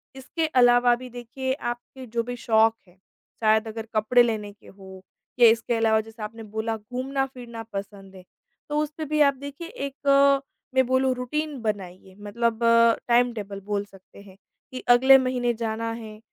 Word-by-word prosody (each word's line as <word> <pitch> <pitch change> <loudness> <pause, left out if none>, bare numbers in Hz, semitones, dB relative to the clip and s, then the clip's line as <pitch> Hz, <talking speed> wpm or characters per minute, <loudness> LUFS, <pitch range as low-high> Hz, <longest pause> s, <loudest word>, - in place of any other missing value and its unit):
इसके 310 +5 -3
अलावा 245 -3 +4
भी 250 +1 -10
देखिए 245 +2 -4 0.2
आपके 255 +2 -10
जो 230 0 -2
भी 245 +1 -5
शौक 225 -1 +3
हैं, 180 +1 -23 0.5
शायद 220 +1 +3
अगर 220 0 -6
कपड़े 240 +3 +4
लेने 215 -3 -2
के 205 - -22
हो 190 -1 -13 0.4
या 235 - +8
इसके 230 +1 0
अलावा 220 -1 +2
जैसे 220 0 -11
आपने 225 +1 -7
बोला 220 +1 -3
घूमना-फिरना 250 0 -5
पसंद 195 -1 -8
है। 185 - -12 0.5
तो 295 - -1
उस 305 -1 -2
पे 315 - -4
भी 305 +1 0
आप 280 - -2
देखिए 285 +4 -8
एक 275 -1 +2 0.4
मैं 260 -1 +4
बोलूँ 260 0 +2
रूटीन 285 +3 -3
बनाइए 190 -3 -5
मतलब 225 +2 -2 0.5
टाइम-टेबल 235 -5 +1
बोल 205 -1 -2
सकते 195 0 -18
हैं 195 -1 -16 0.3
कि 255 - -6 0.2
अगले 265 +2 +7
महीने 255 -2 0
जाना 230 0 -3
है, 220 -2 -8
235 Hz, 165 wpm, -25 LUFS, 215-260 Hz, 0.5 s, या